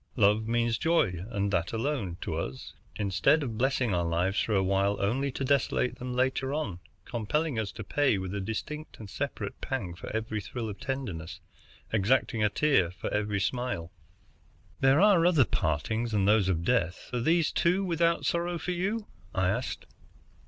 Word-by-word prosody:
Love 105 -1 +3
means 115 -1 +1
joy, 110 - +2
and 100 -3 -1
that 85 0 0
alone, 115 - -2
to - - -3
us, 65 - -5 0.2
instead 105 - +2
of 120 -5 -4
blessing 130 -4 +1
our 85 -1 +1
lives 85 +4 +1
for 110 - 0
a 95 - +3
while 100 +1 +1
only 130 +8 0
to 135 - -3
desolate 130 -2 +1
them 125 0 -4
later 130 +2 0
on, 100 - -3 0.3
compelling 125 +4 -1
us 105 -2 -2
to - - -7
pay 145 -8 +2
with 95 0 -4
a 100 - -2
distinct 150 +10 -5
and 105 -3 -10
separate - - -4
pang 100 -10 -3
for 85 - -8
every 110 -1 -2
thrill 115 +2 -5
of 100 - -7
tenderness, 120 - -4 0.5
exacting 110 +1 +2
a 105 - +4
tear 120 - +3
for 90 - -5
every 105 -1 0
smile." 95 -4 -2 0.9
"There 135 +2 +5
are 195 -3 +6
other 165 -7 +5
partings 110 +9 -1
than 100 -2 +2
those 105 -2 +4
of 85 -2 0
death. 90 -8 0
Are 120 - 0
these, 165 +4 +3
too, 185 +3 +2
without 170 -1 +1
sorrow 170 0 0
for 180 - -3
you?" 200 +5 -1 0.3
I 95 -1 +2
asked. 120 +6 -2
115 Hz, 175 wpm, -29 LUFS, 95-140 Hz, 0.9 s, are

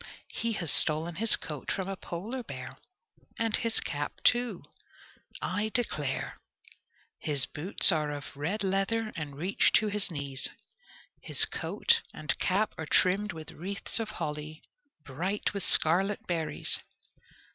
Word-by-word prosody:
He 230 0 -1
has 170 -6 0
stolen 160 +2 +4
his 225 +1 +8
coat 150 -3 -7
from 190 -1 -2
a 195 - -3
polar 205 +9 -5
bear, 130 - -8 0.7
and 225 -1 +1
his 230 -2 0
cap, 145 -1 -4
too, 240 - +2 0.8
I 205 +4 -1
declare! 150 - -1 0.8
His 145 -4 +1
boots 180 +5 +4
are 155 -3 0
of 145 -1 -7
red 170 +10 -2
leather 195 +4 0
and 150 -4 -6
reach 180 +6 +2
to 215 - +4
his 205 0 0
knees. 140 -5 -2 0.7
His - - +4
coat 465 -1 +1
and 150 -3 -1
cap 205 +4 +1
are 160 - -4
trimmed 195 +6 +2
with 160 -2 -9
wreaths 200 +6 -2
of 225 -1 -3
holly, 155 -5 -5 0.4
bright 180 +12 -2
with 200 - -3
scarlet 190 +6 +3
berries. 165 -3 -1
185 Hz, 135 wpm, -29 LUFS, 150-210 Hz, 0.8 s, his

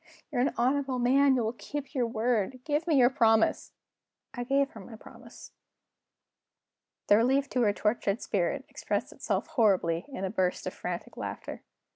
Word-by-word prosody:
"You're 245 - 0
an 265 - 0
honorable 265 +2 +1
man; 265 +3 +4
you 245 - +1
will 220 +1 -1
keep 290 +4 -7
your 250 -4 0
word. 230 +1 -1
Give 300 +3 -1
me 320 - +3
your 250 -1 +5
promise!" 225 -4 +2 0.6
I 245 - -4
gave 275 +2 +1
her 220 - -11
my 220 +4 -11
promise. - - -14 1.5
The 205 - +5
relief 265 +5 +2
to 250 - +1
her 210 -3 +4
tortured 210 0 0
spirit 220 +8 -1
expressed - - -3
itself - - -2
horribly 195 - +1
in 260 -9 -5
a 190 - -3
burst 185 -4 -1
of - - -4
frantic - - -6
laughter. - - -6
245 Hz, 165 wpm, -29 LUFS, 215-275 Hz, 1.5 s, your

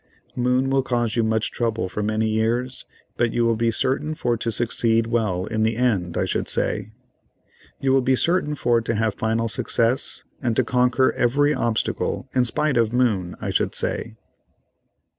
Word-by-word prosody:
Moon 125 +2 +1
will 135 0 +3
cause 120 -3 -1
you 115 - +2
much 110 -1 0
trouble 115 -4 -1
for 100 +3 -4
many 110 +1 0
years, 115 +4 -1 0.3
but 120 -1 +1
you 120 - +2
will 115 0 +2
be 115 +1 +1
certain 135 +6 -1
for 120 -7 0
to 115 0 -2
succeed 115 0 +1
well 110 -6 -1
in 110 0 -2
the 110 +1 +1
end, 100 -9 0
I - - +1
should - - -2
say. 110 - 0 0.9
You 135 -1 +1
will 135 - +4
be 130 +1 +2
certain 165 0 +1
for 120 -4 +2
to 115 0 -2
have 110 -1 0
final 115 +1 -1
success 115 +2 0 0.2
and 120 -3 0
to 130 - +3
conquer 125 +2 +2
every 145 +5 +2
obstacle, 120 +1 -1
in 125 -1 +3
spite 140 +2 0
of 115 -2 +2
Moon, 110 -8 0
I - - -3
should - - 0
say." - - -2
115 Hz, 180 wpm, -23 LUFS, 110-125 Hz, 0.9 s, will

